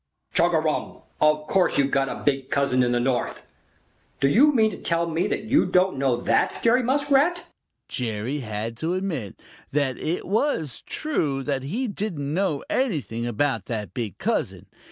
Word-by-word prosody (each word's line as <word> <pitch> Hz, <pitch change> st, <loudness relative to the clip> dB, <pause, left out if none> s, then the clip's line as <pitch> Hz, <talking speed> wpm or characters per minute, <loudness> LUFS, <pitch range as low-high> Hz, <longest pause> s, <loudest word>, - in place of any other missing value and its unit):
"Chugarum! 160 Hz, -2 st, +1 dB, 0.2 s
Of 155 Hz, 0 st, +3 dB
course 185 Hz, +2 st, +2 dB
you've 140 Hz, -1 st, +2 dB
got 135 Hz, -1 st, +1 dB
a -, -, -6 dB
big 135 Hz, -2 st, 0 dB
cousin 140 Hz, -2 st, +2 dB
in 120 Hz, -1 st, +2 dB
the 120 Hz, -, +2 dB
North. 125 Hz, 0 st, -1 dB, 0.7 s
Do 135 Hz, -, +3 dB
you 270 Hz, -, +5 dB
mean 220 Hz, -5 st, +3 dB
to -, -, -9 dB
tell 170 Hz, 0 st, +1 dB
me 165 Hz, +1 st, 0 dB
that -, -, -2 dB
you 265 Hz, +8 st, +3 dB
don't 185 Hz, -5 st, +2 dB
know 130 Hz, -3 st, +1 dB
that, -, -, +1 dB
Jerry 240 Hz, +2 st, +4 dB
Muskrat?" 280 Hz, +6 st, +2 dB, 0.4 s
Jerry 120 Hz, +3 st, -2 dB
had 110 Hz, -1 st, -4 dB
to 165 Hz, +7 st, -1 dB
admit 165 Hz, -, -4 dB, 0.3 s
that 135 Hz, -2 st, 0 dB
it 170 Hz, +3 st, -2 dB
was 195 Hz, -, 0 dB
true 150 Hz, -, -1 dB
that 140 Hz, -1 st, -1 dB
he 215 Hz, -, -2 dB
didn't 175 Hz, -9 st, -3 dB
know 170 Hz, -5 st, 0 dB
anything 145 Hz, -, -1 dB
about 120 Hz, -3 st, -1 dB
that 105 Hz, -6 st, -4 dB
big 110 Hz, -7 st, -4 dB
cousin. -, -, -2 dB
150 Hz, 165 wpm, -24 LUFS, 130-195 Hz, 0.7 s, you